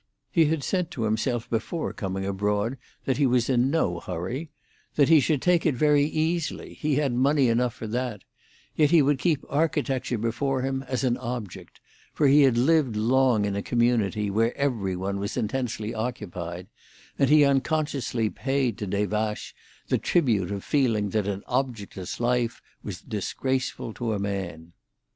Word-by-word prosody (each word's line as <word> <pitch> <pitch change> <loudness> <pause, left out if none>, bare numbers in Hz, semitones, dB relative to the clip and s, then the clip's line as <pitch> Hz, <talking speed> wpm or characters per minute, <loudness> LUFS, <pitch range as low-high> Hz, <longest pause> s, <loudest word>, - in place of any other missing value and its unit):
He 165 -5 +4
had 155 -1 0
said 180 -3 -1
to 125 -9 -4
himself 110 +2 0
before 120 +9 -2
coming 95 -3 -3
abroad 105 +5 -1 0.3
that 130 - 0
he 140 -2 +3
was 125 0 +2
in 125 +1 +3
no 100 - 0
hurry; 95 - -5 0.5
that 145 -1 +4
he 160 -2 +8
should 145 -1 +1
take 180 -2 +3
it 155 -5 +2
very 145 +1 +4
easily—he 155 -1 -1
had 140 -3 +1
money 135 +1 +3
enough 120 +1 +1
for - - -7
that; 115 -2 -3 0.5
yet 150 -2 +4
he 165 -3 +6
would 140 0 +2
keep 150 0 +1
architecture 135 -4 0
before 130 +4 -1
him 135 0 -1
as 130 0 -2
an 125 -2 +1
object, 120 -5 -7 0.3
for 150 - +2
he 145 +2 +6
had 130 -4 +4
lived 135 -2 +3
long 120 0 +3
in 100 -1 -2
a 100 - -1
community 110 -4 +1
where 115 +4 +1
every 115 -10 0
one 100 +2 -3
was 100 +4 -4
intensely 115 -2 -2
occupied, 90 -7 -5 0.5
and 140 - +3
he 150 -1 +7
unconsciously 140 -4 0
paid 135 -1 -1
to 105 - -3
Des 100 +2 0
Vaches 105 0 -2 0.4
the - - +2
tribute 115 - +1
of 100 -1 -4
feeling 115 -8 +1
that 105 -1 0
an 100 0 -3
objectless 115 -8 -3
life 120 -1 0 0.2
was - - -6
disgraceful 130 -3 -3
to 115 -1 -2
a - - -1
man. 85 -4 -4
125 Hz, 165 wpm, -26 LUFS, 105-140 Hz, 0.5 s, he